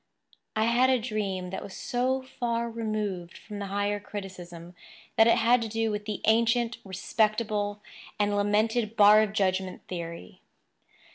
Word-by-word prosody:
I 220 - +2
had 240 +3 +4
a 260 - +4
dream 200 -6 -3
that 190 - -4
was 195 - -9
so 260 +2 -1
far 235 -2 -2
removed 210 -6 -3
from 210 -1 -9
the 200 - -4
higher 205 +1 -1
criticism 180 -4 -8 0.4
that 225 - +6
it 230 - +5
had 235 +1 +4
to 225 - -2
do 225 0 -1
with 210 0 -4
the 210 -1 -4
ancient, 230 +2 +2
respectable, 210 +1 -1 0.4
and 205 0 +2
lamented 215 +2 +1
bar 210 0 +7
of 215 -2 0
judgment 190 -2 -1
theory. 170 - -7
210 Hz, 150 wpm, -28 LUFS, 195-230 Hz, 0.4 s, bar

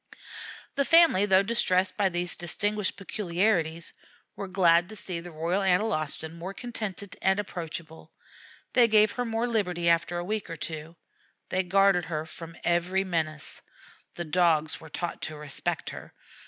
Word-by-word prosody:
The 280 - +1
family, 330 - +5
though 190 0 +5
distressed 190 -4 +1
by 200 -2 +2
these 175 0 0
distinguished 205 +4 0
peculiarities, 175 -4 0 0.4
were 200 - -5
glad 175 -2 +4
to 215 - -9
see 185 -4 -4
the 175 +1 -9
Royal 170 +4 -1
Analostan 180 -5 0
more 175 +4 -7
contented 215 -5 -5
and 190 +1 +3
approachable. 165 -4 -6 0.6
They 245 -2 +6
gave 215 -1 +5
her 245 - -2
more 225 +1 -1
liberty 180 -7 0
after 170 +1 +2
a 175 - -3
week 210 -1 -3
or 165 - -4
two. 160 +1 -6 0.5
They 185 - +1
guarded 190 -1 +3
her 155 -2 -3
from 165 0 -9
every 175 +3 +1
menace. 160 -5 -3 0.5
The 175 - -4
Dogs 160 -2 +2
were 160 - -11
taught 175 +3 -4
to 155 - -4
respect 150 -1 -3
her. - - -10
180 Hz, 155 wpm, -28 LUFS, 165-200 Hz, 0.6 s, They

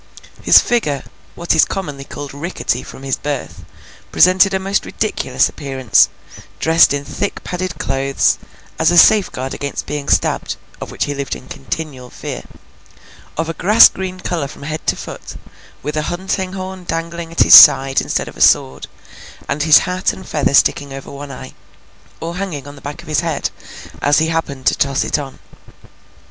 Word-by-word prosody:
His - - +6
figure—what 170 - -1
is 160 - +5
commonly 145 -8 -5
called 145 -1 -8
rickety 170 +6 -3
from 135 - -12
his 135 -1 -2
birth—presented 185 +6 0
a 190 - 0
most 195 +1 -1
ridiculous 135 -11 -1
appearance, 135 -5 +1 0.5
dressed 165 +1 +4
in 145 0 -2
thick 195 +8 -4
padded 180 -2 -5
clothes, 135 -1 0 0.4
as 160 - +3
a 175 - +2
safeguard 165 -10 +4
against 140 0 -5
being 145 0 -5
stabbed - - 0 0.3
(of - - -6
which - - -2
he 145 - -3
lived 140 -1 -4
in 130 - -13
continual 135 -2 -6
fear), - - -7 1.0
of 165 +1 -1
a 165 - -3
grass 210 +8 +6
green 185 -1 -6
colour 170 -5 -3
from 140 - -12
head 155 +1 -6
to - - +2
foot, - - -9 0.5
with 150 - -4
a 155 - 0
hunting 185 +1 -3
horn 190 -1 -7
dangling 165 0 -5
at 165 - 0
his - - +6
side 135 0 +8
instead - - -2
of - - -10
a - - -9
sword, 65 0 +3 0.6
and 150 - -2
his 155 0 +5
hat 185 0 -1
and 190 - -11
feather 140 -2 0
sticking 140 0 +2
over 135 0 -9
one 140 +1 -9
eye, 130 -1 -10 0.7
or 170 +2 -6
hanging 165 -8 -5
on 145 - -9
the 140 - -15
back 145 +1 -8
of - - -17
his 155 - +1
head, 165 -3 -2 0.5
as 145 +1 +3
he 160 +1 +1
happened 140 -5 -3
to - - +4
toss 140 -1 0
it - - -1
on. 135 -2 -8
150 Hz, 175 wpm, -17 LUFS, 140-180 Hz, 1.0 s, side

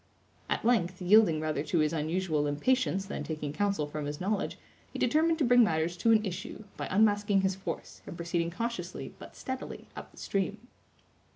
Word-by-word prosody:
At - - -1
length, 185 -7 +2
yielding 185 -3 +5
rather 155 -2 -1
to 165 +3 -1
his 155 0 +2
unusual 160 -1 0
impatience 195 - +1
than 195 - -4
taking 150 -2 -4
counsel 200 -3 0
from 150 0 -5
his 145 0 -4
knowledge, 200 +2 -1 0.3
he - - -6
determined 320 +2 +3
to 310 - +1
bring 245 0 +6
matters 165 -3 +1
to 230 - +3
an 220 -1 +4
issue, 195 +3 -5
by - - -4
unmasking 205 -1 +3
his 190 0 +1
force, 185 -3 -6
and 170 - -7
proceeding 170 0 -1
cautiously, 235 +7 -4
but - - -11
steadily, 260 0 -6
up - - -8
the - - -22
stream. 205 +4 -2
190 Hz, 180 wpm, -30 LUFS, 160-215 Hz, 0.3 s, bring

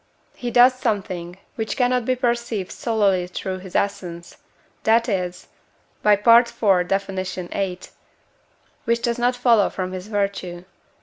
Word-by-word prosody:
he 245 - -5
does 245 +2 +6
something, 190 -7 -3 0.2
which 220 -1 -4
cannot 250 -1 +1
be 255 - +1
perceived 235 -6 -2
solely 200 -6 +1
through 185 +1 -5
his 185 -1 -11
essence, 175 -4 -3 0.4
that 230 +1 +3
is 180 -4 -3 0.5
(by 210 - +5
IV. 210 -4 +4
Def. 195 +1 0
viii.), 185 -1 -4 1.1
which 235 0 0
does 235 0 0
not 245 +1 +2
follow 235 -4 +3
from 185 -1 -4
his 185 +1 -7
virtue. 195 -4 -3
200 Hz, 130 wpm, -22 LUFS, 185-235 Hz, 1.1 s, does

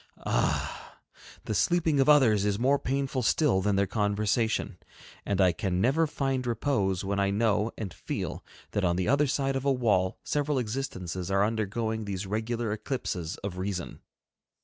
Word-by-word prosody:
Ah! - - -1 0.5
the - - -2
sleeping 165 - +2
of 135 - +4
others 120 -9 +5
is 100 -1 +1
more 135 +5 +2
painful 135 -1 -1
still 125 -4 +2
than 105 +1 +1
their 100 0 +3
conversation. 105 +2 0 0.5
And 100 -1 0
I 95 -2 +5
can 90 0 -2
never 140 +10 +3
find 135 -3 -2
repose 105 -6 0
when 100 +1 -1
I 100 0 +2
know 105 +1 +1
and 100 -6 -5
feel - - -5 0.3
that 105 - -1
on 85 -1 +2
the 90 0 -1
other 140 +4 +3
side 135 0 0
of 135 - -2
a 140 - +3
wall 105 -8 +1
several 145 -1 0
existences 95 -7 -3
are 100 +1 +3
undergoing 110 0 -2
these 100 -1 -4
regular 110 +2 -2
eclipses 105 - -3
of 95 -2 -4
reason. 95 -2 -4
110 Hz, 165 wpm, -28 LUFS, 100-135 Hz, 0.5 s, others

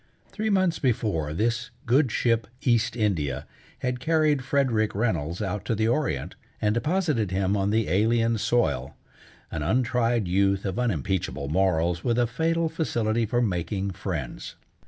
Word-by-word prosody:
Three 220 0 -2
months 185 -4 +2
before 105 - 0
this 115 +7 -1 0.2
good 130 +2 +3
ship 115 -2 +1 0.2
East 120 -1 +2
India 75 - -1 0.4
had 125 0 -1
carried 155 -2 +2
Frederick 125 -7 +1
Reynolds 90 -5 -1
out 100 0 -3
to 115 - 0
the 110 +1 +1
Orient 120 - -1 0.3
and 105 0 +1
deposited 150 - 0
him 95 +1 0
on 100 0 +1
the 110 +1 +1
alien 115 +3 +2
soil, 110 - 0 0.6
an 80 - -3
untried 115 - +1
youth 100 +2 +2
of 95 +3 -2
unimpeachable 90 - -1
morals 85 -1 +1
with 120 -1 +1
a 120 - +4
fatal 165 +7 0
facility 115 -9 0
for 120 +2 +1
making 95 0 -1
friends. 85 -9 -5
110 Hz, 145 wpm, -26 LUFS, 95-125 Hz, 0.6 s, a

